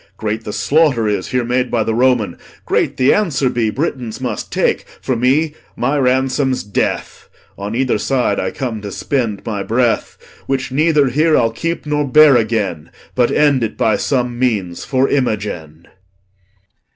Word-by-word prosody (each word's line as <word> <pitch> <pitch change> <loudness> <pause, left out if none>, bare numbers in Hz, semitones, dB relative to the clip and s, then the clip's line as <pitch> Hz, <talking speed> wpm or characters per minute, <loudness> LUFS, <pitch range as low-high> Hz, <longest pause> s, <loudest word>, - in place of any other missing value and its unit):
Great 110 +1 -3
the 105 - -4
slaughter 130 +1 +2
is 100 -3 -1
Here 125 -1 0
made 125 +1 0
by 115 -2 +1
th' - - -4
Roman; 120 -6 +2 0.3
great - - 0
the 130 - +4
answer 145 -11 +1
be 115 -2 0
Britons 125 -3 -3
must 120 -5 -4
take. - - +1 0.2
For 130 - -2
me, 140 +6 +2 0.2
my 135 +4 0
ransom's 130 0 +1
death; 100 -1 -3 0.3
On 100 +3 -5
either 130 -3 +1
side 125 -4 0
I 95 - -1
come 115 -1 -4
to 100 -1 -6
spend 115 -3 -2
my 105 -3 -3
breath, 115 +3 0 0.3
Which 135 -1 -2
neither 150 0 +3
here 155 +5 +3
I'll 115 -1 +2
keep 165 +10 -3
nor 150 -1 0
bear 150 +1 +6
again, 105 -9 -1 0.2
But 125 -2 +2
end 145 -4 +3
it 110 - -3
by 110 -2 +2
some 120 +1 -1
means 105 -9 -1
for 130 0 +1
Imogen. 100 - -2
125 Hz, 165 wpm, -17 LUFS, 110-135 Hz, 0.3 s, bear